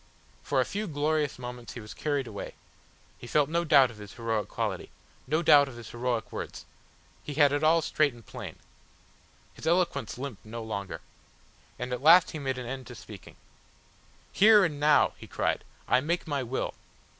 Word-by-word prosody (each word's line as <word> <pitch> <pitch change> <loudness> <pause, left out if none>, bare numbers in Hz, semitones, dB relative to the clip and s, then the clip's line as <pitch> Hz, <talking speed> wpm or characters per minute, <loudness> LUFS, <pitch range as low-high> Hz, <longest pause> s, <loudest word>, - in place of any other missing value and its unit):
For - - 0
a - - +3
few 210 +1 -3
glorious 150 -1 0
moments 125 -1 -8
he - - -7
was 105 -1 -9
carried 145 -3 -1
away; 105 -4 -7 0.6
he 120 - -9
felt 145 +2 +2
no 170 +1 +1
doubt 140 -6 +5
of 110 - -14
his 105 -1 -10
heroic 115 -3 -2
quality, - - -3 0.4
no 155 +5 +1
doubt 145 -3 +7
of 130 - -9
his 120 -2 -10
heroic 120 -2 -2
words, - - -6 0.6
he 145 - -7
had 145 -2 +5
it 145 +1 0
all 160 +1 +4
straight 150 -1 +2
and 120 -3 -16
plain. - - -8 1.0
His - - -8
eloquence 175 -4 +1
limped 130 -5 -6
no 115 +1 -7
longer. 100 -3 -5 0.8
And 125 0 -4
at 125 - -3
last 165 +4 +7
he 155 - -5
made 135 -2 -2
an 125 - -5
end 130 0 -6
to 125 - -9
speaking. 105 -3 -12 1.0
"Here 210 -1 +6
and 150 -4 -3
now," 150 0 +4
he - - -11
cried, - - -1 0.2
"I 125 +1 +4
make 170 +5 -1
my 145 -3 -1
will. 130 +1 -3
135 Hz, 185 wpm, -28 LUFS, 120-155 Hz, 1.0 s, doubt